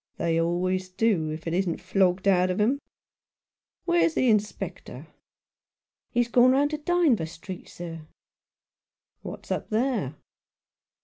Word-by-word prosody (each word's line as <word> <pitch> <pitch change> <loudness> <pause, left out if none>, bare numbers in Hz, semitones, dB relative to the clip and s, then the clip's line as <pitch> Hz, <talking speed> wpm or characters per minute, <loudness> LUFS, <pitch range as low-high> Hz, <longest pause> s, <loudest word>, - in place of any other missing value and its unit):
They 165 0 +1
always 185 +2 -1
do, 185 -5 +1
if 155 +1 -6
it 165 - -2
isn't 180 -2 0
flogged 190 0 +1
out 185 -1 +4
of 185 - -1
them. 240 +7 +2 1.1
Where's 345 -2 +2
the 255 - +3
Inspector? 210 -1 -2 0.4
" - - -68
" - - -68
He's 240 -1 +3
gone 245 +2 +5
round 285 +2 +2
to 305 - -3
Dynevor 300 - +2
Street, 175 +3 -9
sir." 165 -3 -8 1.1
"What's - - -8
up - - -2
there?" 220 - 0
190 Hz, 135 wpm, -26 LUFS, 170-245 Hz, 1.1 s, gone